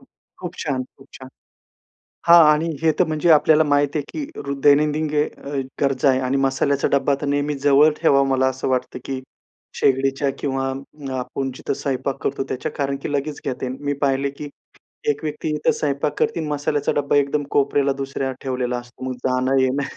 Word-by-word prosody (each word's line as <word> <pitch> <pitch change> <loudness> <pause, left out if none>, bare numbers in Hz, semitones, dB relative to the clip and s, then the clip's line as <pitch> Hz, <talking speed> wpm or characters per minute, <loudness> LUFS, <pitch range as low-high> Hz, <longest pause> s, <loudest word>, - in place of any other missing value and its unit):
खूप 185 -8 -12
छान, 135 -4 -2 0.2
खूप 135 - -17
छान! 130 0 -11 1.0
हां. 170 -1 +9
आणि 160 +2 -1
हे 160 -1 +4
तर 180 - +5
म्हणजे 155 +2 0
आपल्याला 155 +1 +5
माहीत 145 0 +1
आहे, 150 - +1
की 305 - -5
अ, - - -6
रो 140 - -2
दैनंदिन 150 +2 +4 0.7
गरजा 135 0 +2
आहे 130 - +3
आणि 130 +2 0
मसाल्याचा 140 +1 +1
डब्बा 140 0 +2
तर - - -2
नेहमी 145 +1 0
जवळ 145 +2 +6
ठेवावा 140 -4 +4
मला 130 0 +2
असं 130 0 -2
वाटतं, 125 0 -1
की 130 -1 -4 0.6
शेगडीच्या 135 +1 +2
किंवा 135 -1 -1 0.5
आपण 135 +1 -4
जिथं - - -3
स्वयंपाक 135 -1 -2
करतो 135 0 -1
त्याच्या 130 +4 -3
कारण 140 -1 -1
की - - -4
लगेच 145 +1 -2
घेता 130 -1 -3
येईल. 130 +1 -5
मी 145 - +1
पाहिले 140 0 +1
की 145 +1 -8 0.6
एक 145 - -2
व्यक्ती 150 +1 -3
इथं 150 - +1
स्वयंपाक 145 0 -2
करते - - 0
आणि 155 - -4
मसाल्याचा 145 0 0
डब्बा 145 0 +1
एकदम 145 +1 +2
कोपऱ्याला 140 0 +2
दुसऱ्या 135 -1 -3
ठेवलेला 125 -2 -2
असतो. 120 +1 -11
मग 130 -1 -3
जाणं-येणं. 130 +1 +1
140 Hz, 175 wpm, -21 LUFS, 135-150 Hz, 1.0 s, हां